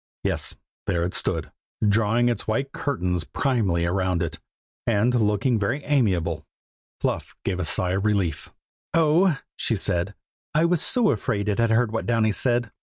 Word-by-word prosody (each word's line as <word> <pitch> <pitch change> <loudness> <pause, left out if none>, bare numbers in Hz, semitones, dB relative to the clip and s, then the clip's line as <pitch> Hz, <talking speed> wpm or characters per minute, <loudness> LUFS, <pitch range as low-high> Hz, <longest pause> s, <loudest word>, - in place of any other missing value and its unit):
Yes, - - 0 0.3
there 85 -1 +1
it 90 - -2
stood, - - 0 0.4
drawing 115 +3 +3
its 120 - -1
white 135 +6 -1
curtains 90 - -1
primly 100 - 0
round 90 -1 0
it, 85 - -4 0.5
and 115 +2 +2
looking 110 +1 +2
very 120 +9 -1
amiable. 90 - +1 0.6
Fluff - - -2
gave 95 -2 -1
a 90 - -1
sigh 90 +2 +2
of 95 +1 0
relief. 95 -8 0 0.4
"Oh," 165 +1 +4 0.2
she 115 - 0
said, 95 0 -1 0.4
"I 155 +2 +4
was 170 -1 +2
so 245 -4 +4
afraid 105 -1 -1
it 105 +1 0
had 115 0 +3
heard 115 0 +2
what 110 - -3
Downy 115 -2 +2
said." 120 0 +1
110 Hz, 160 wpm, -24 LUFS, 95-125 Hz, 0.6 s, Oh